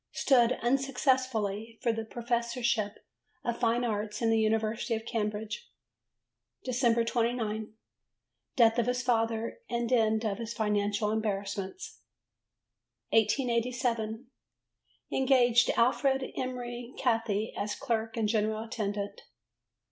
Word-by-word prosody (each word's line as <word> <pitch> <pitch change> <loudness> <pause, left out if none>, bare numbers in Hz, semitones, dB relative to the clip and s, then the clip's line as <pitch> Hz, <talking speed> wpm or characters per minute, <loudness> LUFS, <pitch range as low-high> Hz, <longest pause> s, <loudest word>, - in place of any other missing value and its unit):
Stood, 250 -2 +4
unsuccessfully, 250 -5 0
for 235 - +2
the 225 0 -3
Professorship 235 -2 -1 0.4
of 235 -1 -2
Fine 235 0 +2
Arts 210 -2 -2
in 230 -1 +2
the 225 - +3
University 220 +2 +1
of 220 0 -5
Cambridge. 215 - -3 1.0
Dec. 240 -2 +2
29. 225 -3 -1 0.8
Death 230 -3 +5
of 235 - +1
his 250 0 0
father 230 - 0
and 235 +1 -1
end 220 -1 +3
of 205 0 -1
his 230 0 -5
financial 210 0 0
embarrassments. 200 -3 -3 1.1
1887. 235 0 +1 0.9
Engaged 245 -3 +4
Alfred 265 +2 +2
Emery 245 -1 -5
Cathie 225 -3 0
as 210 +1 -2
clerk 225 -3 -2
and 220 -2 +1
general 215 0 0
attendant. 205 -3 -4
230 Hz, 105 wpm, -30 LUFS, 215-245 Hz, 1.1 s, Death